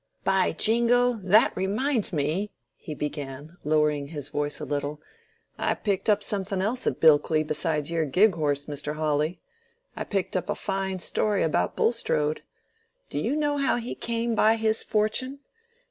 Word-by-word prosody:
"By 190 -1 +2
jingo! 235 +6 +3
that 205 +4 +4
reminds 215 +5 0
me," 160 +6 -1 0.3
he 155 -5 -8
began, 145 +2 -6
lowering 150 -1 +1
his 145 -2 -6
voice 145 0 -2
a 150 - -5
little, 145 +1 -3 0.6
"I - - +1
picked 200 -1 -1
up 210 -1 +3
something 195 -1 -2
else 230 +7 -1
at - - -1
Bilkley 155 0 +4
besides 155 0 -2
your 165 -1 +1
gig 190 +9 +4
horse, 145 -3 -1
Mr. 150 0 -4
Hawley. 155 +2 -1 0.5
I - - -3
picked 195 -2 -2
up 185 - -2
a - - 0
fine 190 -1 -2
story 210 +1 0
about 120 - 0
Bulstrode. 155 -10 0 0.7
Do - - -2
you 285 - 0
know 295 -1 0
how 275 -2 +2
he 240 0 -4
came 235 0 -2
by 220 +1 +4
his 220 -1 0
fortune? 255 +6 -1
185 Hz, 160 wpm, -26 LUFS, 150-220 Hz, 0.7 s, that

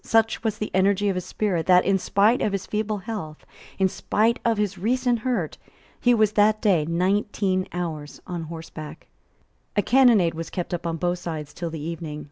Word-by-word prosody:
Such 225 0 +2
was 220 -2 -1
the 215 - -4
energy 200 +2 +3
of 195 - 0
his 180 - -3
spirit 185 -6 -1
that, 180 -1 +6
in 195 -1 +2
spite 210 +6 +3
of 205 - 0
his 195 -1 -2
feeble 215 0 -2
health, 190 -7 -7 0.3
in 190 - +3
spite 220 +4 0
of 230 -2 +2
his 205 -2 0
recent 245 +3 +1
hurt, 215 - -2 0.4
he 245 0 +4
was 215 -2 +3
that 215 0 +3
day 185 -9 +2
nineteen 185 +2 0
hours 160 -4 -5
on 175 -2 -5
horseback, 160 -1 -9 0.7
A 205 - +2
cannonade 235 -9 +5
was 165 0 -6
kept 180 -1 -4
up 175 -1 -3
on 165 0 -2
both 175 +1 -1
sides 155 -4 -6
till 170 -2 -4
the 160 -1 -6
evening. 155 -1 -5
190 Hz, 190 wpm, -24 LUFS, 170-215 Hz, 0.7 s, that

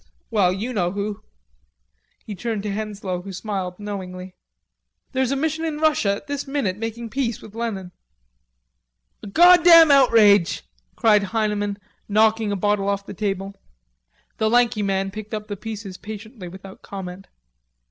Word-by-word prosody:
Well, 200 -5 +3
you 215 +7 -3
know 180 -4 0
who." 205 0 -4 1.0
He 215 - -6
turned 215 +1 -3
to 210 - -3
Henslowe, 200 -3 -4
who 195 +2 -8
smiled 190 -2 -4
knowingly. 185 -3 -7 0.8
"There's 260 -1 0
a - - +1
mission 315 +3 -1
in 315 -2 -2
Russia 300 -10 +2
at 200 - -10
this 285 -1 -4
minute 270 -10 -1
making 225 +1 -5
peace 250 -5 -1
with 210 - -13
Lenin." 215 -6 -4 1.3
"A - - -9
goddam 340 - +7
outrage!" 215 - +5 0.3
cried 210 -2 +4
Heineman, 205 -1 -1 0.3
knocking 215 0 +3
a - - 0
bottle 200 0 0
off 200 0 -2
the - - -8
table. 195 -2 -3 0.9
The 220 - +2
lanky 240 -2 +3
man 195 -1 -1
picked 215 +2 -6
up 210 0 -6
the 205 - -4
pieces 205 -2 -7
patiently, 215 -1 -9
without 190 +2 -11
comment. 190 -1 -8
210 Hz, 145 wpm, -22 LUFS, 195-230 Hz, 1.3 s, goddam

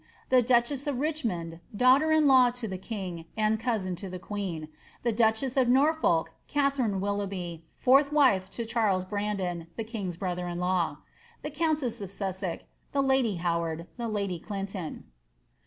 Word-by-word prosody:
The 255 -1 +6
duchess 255 +4 +2
of 275 -4 -1
Richmond 220 - -2 0.2
(daughter 265 +6 +5
in 315 -1 +4
law 260 -3 +7
to 245 -1 -5
the 190 -2 -5
king, 185 -6 -5
and 215 0 +2
cousin 215 -6 -1
to 190 +2 -6
the 185 - -5
queen) 180 -5 -4 0.4
The 235 - +2
duchess 225 +3 +1
of 260 -2 +4
Norfolk 270 - +3 0.2
(Katharine 275 -8 +1
Willoughby, 195 -4 -3
fourth 275 +2 +4
wife 255 -11 +4
to 230 +3 -5
Charles 215 -5 +1
Brandon, 190 -4 -2
the 225 - -3
king's 205 -6 -5
brother 180 -1 -3
in 175 0 -4
law). 180 -4 0 0.5
The 300 - -4
G>tinte88 295 -7 0
of 195 - -5
Sussex. 190 -2 -4 0.3
The 275 -1 +2
lady 265 -6 +2
Howard. 170 -1 -1
Tlie 230 -2 -2
lady 200 -4 -2
Clinton. 195 -3 -5
210 Hz, 155 wpm, -28 LUFS, 185-255 Hz, 0.5 s, law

